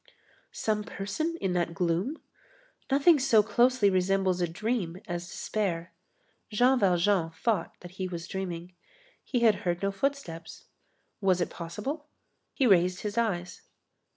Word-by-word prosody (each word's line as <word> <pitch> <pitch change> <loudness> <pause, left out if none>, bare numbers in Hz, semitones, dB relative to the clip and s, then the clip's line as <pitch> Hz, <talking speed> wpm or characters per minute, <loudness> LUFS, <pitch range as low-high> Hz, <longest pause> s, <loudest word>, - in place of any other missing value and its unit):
Some 215 -1 0
person 230 +11 -3
in 190 -2 -1
that 170 -1 -1
gloom? 180 - -1 0.7
Nothing 285 +3 +5
so 230 -5 +5
closely 240 +1 +3
resembles 185 0 +1
a 175 - +2
dream 185 0 -2
as 175 -1 -4
despair. 175 -4 -2 0.6
Jean 245 +4 +3
Valjean 180 -2 +3
thought 170 +2 -1
that 175 - -10
he 185 - 0
was 170 -2 -6
dreaming. 180 -2 -5 0.5
He 245 - -1
had 220 -4 +5
heard 175 +1 -2
no 195 - +1
footsteps. 195 -7 -4 0.6
Was 190 -2 +3
it 175 - -1
possible? 210 - -5 0.5
He 270 - +2
raised 180 -4 +4
his 210 -1 -4
eyes. 195 -7 -1
195 Hz, 135 wpm, -29 LUFS, 175-230 Hz, 0.7 s, Nothing